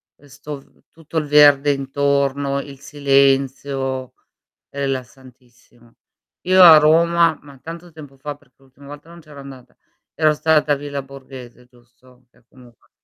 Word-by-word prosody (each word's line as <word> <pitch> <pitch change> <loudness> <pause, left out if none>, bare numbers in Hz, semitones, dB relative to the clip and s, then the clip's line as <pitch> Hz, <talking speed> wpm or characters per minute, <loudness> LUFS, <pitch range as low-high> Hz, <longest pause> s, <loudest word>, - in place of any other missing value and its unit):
questo 145 0 -13
tutto 165 0 -9
il 155 - -1
verde 145 -1 +5
intorno, 140 0 -1
il 140 -2 -13
silenzio 135 -1 -1 0.6
è 140 0 -6
rilassantissimo. 125 -2 -10 0.5
Io 185 0 +6
a 165 -3 +9
Roma 165 +1 +2
ma 140 -2 -17
tanto 170 +4 -11
tempo 145 -4 -14
fa, 145 +2 -7
perché 130 -3 -30
l'ultima 135 +1 -20
volta 145 +3 -13
non 170 0 -14
c'ero 150 -2 -15
andata, 135 -2 -14 0.4
ero 155 0 +2
stata 150 -1 +1
a - - 0
Villa 140 -1 -7
Borghese, 130 -2 -14
giusto? 125 +1 -25
Che - - -30
comunque. 120 -3 -21
140 Hz, 140 wpm, -19 LUFS, 130-150 Hz, 0.6 s, a